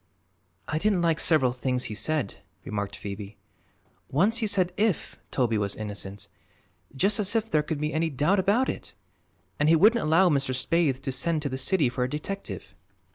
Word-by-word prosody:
"I 155 Hz, -, -1 dB
didn't 195 Hz, -2 st, +1 dB
like 165 Hz, -2 st, +2 dB
several 140 Hz, -7 st, +3 dB
things 125 Hz, 0 st, -2 dB
he 105 Hz, -, -3 dB
said," 145 Hz, +1 st, -1 dB, 0.3 s
remarked 100 Hz, 0 st, -3 dB
Phoebe. 100 Hz, +1 st, -7 dB, 0.7 s
"Once 200 Hz, -, +2 dB
he 220 Hz, -, 0 dB
said 185 Hz, -3 st, +1 dB
'if' 205 Hz, -3 st, -1 dB
Toby 115 Hz, -5 st, +1 dB
was 100 Hz, -1 st, 0 dB
innocent 100 Hz, -2 st, -4 dB, 0.7 s
just 200 Hz, +10 st, +2 dB
as 205 Hz, +2 st, 0 dB
if 225 Hz, 0 st, 0 dB
there 150 Hz, -, +3 dB
could 150 Hz, 0 st, -4 dB
be 150 Hz, +1 st, -2 dB
any 160 Hz, +1 st, +1 dB
doubt 155 Hz, +8 st, +2 dB
about 210 Hz, +8 st, +2 dB
it! -, -, -5 dB, 0.6 s
and 150 Hz, +1 st, +3 dB
he 165 Hz, -, +6 dB
wouldn't 215 Hz, +8 st, +5 dB
allow 165 Hz, +5 st, +4 dB
Mr. 135 Hz, -5 st, +1 dB
Spaythe 140 Hz, -1 st, +1 dB
to 135 Hz, -, -3 dB
send 155 Hz, +4 st, -1 dB
to 145 Hz, -, -1 dB
the 130 Hz, -, -4 dB
city 150 Hz, +2 st, +2 dB
for 125 Hz, +1 st, -1 dB
a 125 Hz, -, -1 dB
detective." 175 Hz, +8 st, -5 dB
150 Hz, 185 wpm, -27 LUFS, 125-190 Hz, 0.7 s, he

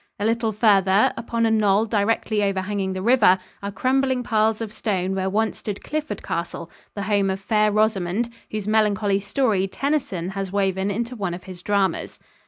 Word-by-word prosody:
A 205 Hz, -, -1 dB
little 230 Hz, 0 st, +1 dB
farther, 200 Hz, -2 st, +4 dB
upon 230 Hz, 0 st, -1 dB
a 225 Hz, -, +2 dB
knoll 210 Hz, -1 st, +3 dB
directly 215 Hz, 0 st, 0 dB
overhanging 195 Hz, 0 st, -1 dB
the 185 Hz, 0 st, -4 dB
river, 225 Hz, -5 st, +5 dB, 0.2 s
are 200 Hz, 0 st, -4 dB
crumbling 260 Hz, +3 st, +1 dB
piles 220 Hz, -2 st, +1 dB
of 220 Hz, -2 st, -5 dB
stone 190 Hz, -4 st, -1 dB
where 190 Hz, 0 st, -1 dB
once 220 Hz, +2 st, 0 dB
stood 205 Hz, -2 st, -5 dB
Clifford 300 Hz, -10 st, -4 dB
Castle, 170 Hz, 0 st, -4 dB, 0.2 s
the 200 Hz, -, -3 dB
home 200 Hz, -1 st, +1 dB
of 190 Hz, 0 st, -2 dB
Fair 210 Hz, +1 st, +2 dB
Rosamond, 215 Hz, +1 st, 0 dB, 0.2 s
whose 215 Hz, -1 st, -4 dB
melancholy 210 Hz, -2 st, +2 dB
story 200 Hz, -1 st, 0 dB
Tennyson 265 Hz, -, -2 dB
has 195 Hz, -1 st, -4 dB
woven 195 Hz, -1 st, 0 dB
into 235 Hz, +5 st, -3 dB
one 195 Hz, -6 st, -3 dB
of 180 Hz, -, -11 dB
his 185 Hz, -2 st, -10 dB
dramas. 200 Hz, -1 st, 0 dB
205 Hz, 175 wpm, -23 LUFS, 195-225 Hz, 0.2 s, river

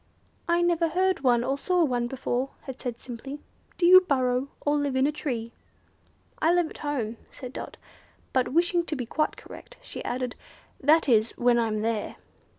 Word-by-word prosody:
"I 345 Hz, 0 st, +3 dB
never 340 Hz, -1 st, +2 dB
heard 370 Hz, +3 st, +1 dB
of -, -, -18 dB
one 240 Hz, -2 st, +4 dB
or 270 Hz, +3 st, -1 dB
saw 360 Hz, +1 st, +2 dB
one 245 Hz, -5 st, 0 dB
before," 260 Hz, 0 st, -2 dB, 0.2 s
it 265 Hz, -1 st, -7 dB
said, 240 Hz, -2 st, -4 dB
simply. 260 Hz, +4 st, -8 dB, 0.4 s
"Do 350 Hz, -, +2 dB
you 370 Hz, +1 st, +9 dB
burrow, 260 Hz, -5 st, +1 dB
or 290 Hz, 0 st, +1 dB
live 285 Hz, -2 st, 0 dB
in 260 Hz, +1 st, +3 dB
a 295 Hz, -, +2 dB
tree?" 245 Hz, -6 st, -4 dB, 0.9 s
"I 325 Hz, -, +3 dB
live 350 Hz, -3 st, +1 dB
at -, -, -11 dB
home," 245 Hz, -7 st, -2 dB
said 255 Hz, -1 st, -9 dB
Dot; -, -, -7 dB, 0.6 s
but, 255 Hz, -1 st, +2 dB
wishing 345 Hz, +3 st, +2 dB
to 310 Hz, -, -3 dB
be 250 Hz, -3 st, -3 dB
quite 305 Hz, +6 st, -1 dB
correct, -, -, -12 dB
she -, -, -8 dB
added, 250 Hz, 0 st, -3 dB, 0.5 s
"that 310 Hz, +4 st, +4 dB
is, 225 Hz, -3 st, +3 dB
when 240 Hz, 0 st, +3 dB
I 230 Hz, -, +2 dB
am 215 Hz, -1 st, -2 dB
there." 225 Hz, -2 st, -2 dB
270 Hz, 190 wpm, -27 LUFS, 245-320 Hz, 0.9 s, you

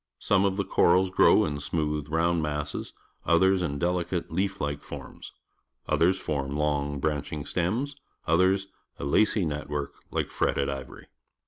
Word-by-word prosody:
Some 100 Hz, -1 st, +2 dB
of 95 Hz, -1 st, 0 dB
the 100 Hz, -, 0 dB
corals 90 Hz, 0 st, +3 dB
grow -, -, +5 dB
in 75 Hz, -1 st, -3 dB
smooth, 75 Hz, -1 st, -2 dB
round 85 Hz, +1 st, +1 dB
masses, 75 Hz, -1 st, -3 dB, 0.3 s
others 95 Hz, +3 st, +4 dB
in 70 Hz, -5 st, -2 dB
delicate 90 Hz, +1 st, -1 dB
leaf 95 Hz, +3 st, -1 dB
like 75 Hz, -1 st, -2 dB
forms; -, -, -9 dB, 0.6 s
others 90 Hz, +3 st, +3 dB
form 70 Hz, -3 st, -3 dB
long, 75 Hz, -1 st, 0 dB
branch 75 Hz, 0 st, -2 dB
ing 75 Hz, -2 st, -4 dB
stems; 115 Hz, +12 st, -1 dB, 0.3 s
others 95 Hz, +4 st, +3 dB, 0.3 s
a -, -, -7 dB
lacy 105 Hz, +6 st, +3 dB
net 75 Hz, -1 st, -4 dB
work 75 Hz, -1 st, -3 dB, 0.2 s
hke -, -, -2 dB
fret -, -, 0 dB
ted 70 Hz, -, 0 dB
ivory. 65 Hz, -2 st, -7 dB
80 Hz, 155 wpm, -27 LUFS, 75-95 Hz, 0.6 s, grow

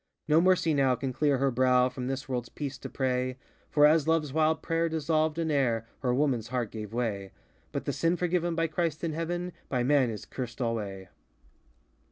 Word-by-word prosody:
No 155 Hz, +1 st, +5 dB
mercy 180 Hz, -3 st, +3 dB
now 135 Hz, -3 st, +3 dB
can 130 Hz, 0 st, -4 dB
clear 145 Hz, +1 st, +2 dB
her 135 Hz, +1 st, +1 dB
brow 125 Hz, 0 st, +4 dB
From 125 Hz, 0 st, -5 dB
this 135 Hz, +1 st, -3 dB
worldŌĆÖs 125 Hz, -3 st, -4 dB
peace 140 Hz, -2 st, -4 dB
to -, -, -7 dB
pray 130 Hz, -1 st, -1 dB, 0.3 s
For 145 Hz, 0 st, +5 dB
as 155 Hz, 0 st, +5 dB
loveŌĆÖs 160 Hz, -4 st, +1 dB
wild 160 Hz, 0 st, +2 dB
prayer 165 Hz, 0 st, 0 dB
dissolved 155 Hz, 0 st, 0 dB
in 165 Hz, -1 st, 0 dB
air, 120 Hz, -6 st, +1 dB
Her 130 Hz, -, -1 dB
womanŌĆÖs 125 Hz, -4 st, +1 dB
heart 120 Hz, -3 st, -2 dB
gave 105 Hz, -2 st, -6 dB
way! 110 Hz, -5 st, -2 dB
ŌĆö -, -, -33 dB, 0.3 s
But -, -, -4 dB
the -, -, -1 dB
sin 170 Hz, +1 st, +1 dB
forgiven 175 Hz, -1 st, 0 dB
by 165 Hz, 0 st, +1 dB
Christ 165 Hz, -1 st, -2 dB
in 165 Hz, -2 st, -1 dB
Heaven 175 Hz, +2 st, -3 dB, 0.2 s
By 125 Hz, -2 st, 0 dB
man 135 Hz, -1 st, +3 dB
is 110 Hz, -2 st, -6 dB
cursed 125 Hz, -2 st, -6 dB
alway! 105 Hz, -6 st, -3 dB
140 Hz, 200 wpm, -29 LUFS, 125-160 Hz, 0.3 s, No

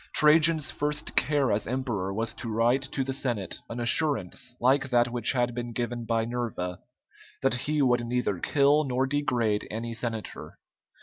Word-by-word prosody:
Trajan's 155 Hz, -1 st, +5 dB
first 150 Hz, +1 st, -2 dB
care 140 Hz, -2 st, +2 dB
as 105 Hz, +1 st, -1 dB
emperor 120 Hz, -7 st, -2 dB
was 110 Hz, +3 st, -2 dB
to 115 Hz, -, -7 dB
write 120 Hz, +4 st, +2 dB
to 135 Hz, -, 0 dB
the 135 Hz, 0 st, -3 dB
Senate 120 Hz, -8 st, -3 dB
an 115 Hz, -, -5 dB
assurance 120 Hz, -, +1 dB
like 130 Hz, +2 st, +2 dB
that 120 Hz, -1 st, +3 dB
which 120 Hz, 0 st, +2 dB
had 120 Hz, -1 st, 0 dB
been 120 Hz, 0 st, -5 dB
given 120 Hz, 0 st, -3 dB
by 115 Hz, -1 st, 0 dB
Nerva, 115 Hz, -7 st, -4 dB, 0.6 s
that 135 Hz, -, +3 dB
he 145 Hz, +4 st, 0 dB
would 120 Hz, -2 st, +1 dB
neither 120 Hz, -6 st, -1 dB
kill 145 Hz, -, +3 dB
nor 130 Hz, -1 st, 0 dB
degrade 125 Hz, -7 st, 0 dB
any 115 Hz, +2 st, -4 dB
senator. 115 Hz, -1 st, -5 dB
120 Hz, 165 wpm, -27 LUFS, 115-135 Hz, 0.6 s, Trajan's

